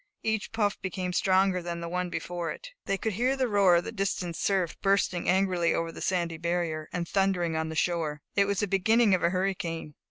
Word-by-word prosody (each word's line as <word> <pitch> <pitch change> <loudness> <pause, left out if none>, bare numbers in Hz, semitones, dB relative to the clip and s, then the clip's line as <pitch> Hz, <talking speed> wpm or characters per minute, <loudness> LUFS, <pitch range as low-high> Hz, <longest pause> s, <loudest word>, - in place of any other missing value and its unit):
Each 220 -2 -1
puff 210 -2 0
became 185 -1 -3
stronger 190 0 +3
than 170 0 -4
the 170 - -5
one 180 +1 -2
before 175 -1 -4
it. - - -8 0.2
They 195 - 0
could 220 +2 -2
hear 250 +7 +1
the 260 -1 +1
roar 200 -5 +4
of 170 - +2
the - - -5
distant 195 -5 -2
surf, 190 -3 0
bursting 195 -3 +1
angrily 185 -2 +2
over 165 0 -2
the - - -10
sandy 170 -3 -1
barrier, 170 -2 -2
and 175 -1 -3
thundering 185 -4 +1
on 160 0 -1
the 160 - -5
shore. 155 -3 -1
It 200 - +4
was 200 0 0
the 205 - 0
beginning 205 +3 +3
of 185 - +2
a 170 - +3
hurricane. 175 -4 -2
180 Hz, 215 wpm, -28 LUFS, 170-195 Hz, 0.2 s, roar